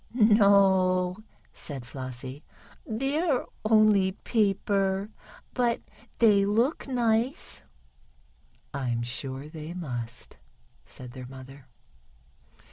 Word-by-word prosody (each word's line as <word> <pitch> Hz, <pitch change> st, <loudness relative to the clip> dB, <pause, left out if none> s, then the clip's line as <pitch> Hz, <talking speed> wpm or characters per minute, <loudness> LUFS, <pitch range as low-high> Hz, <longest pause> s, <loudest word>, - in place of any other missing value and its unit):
"No," 195 Hz, -4 st, +4 dB, 0.4 s
said 135 Hz, -5 st, -6 dB
Flossie, 130 Hz, +2 st, -7 dB, 0.4 s
"they're 270 Hz, +5 st, 0 dB, 0.2 s
only 215 Hz, -3 st, +4 dB
paper, 200 Hz, -1 st, 0 dB, 0.4 s
but 240 Hz, -2 st, +1 dB, 0.4 s
they 210 Hz, -4 st, +5 dB
look 230 Hz, +11 st, +1 dB
nice." 240 Hz, 0 st, 0 dB, 1.1 s
"I'm 120 Hz, -4 st, -1 dB
sure 130 Hz, +3 st, -5 dB
they 155 Hz, +2 st, -8 dB
must," 125 Hz, -8 st, -6 dB, 0.5 s
said 125 Hz, -1 st, -9 dB
their 125 Hz, 0 st, -9 dB
mother. 130 Hz, +1 st, -12 dB
190 Hz, 80 wpm, -27 LUFS, 135-220 Hz, 1.1 s, they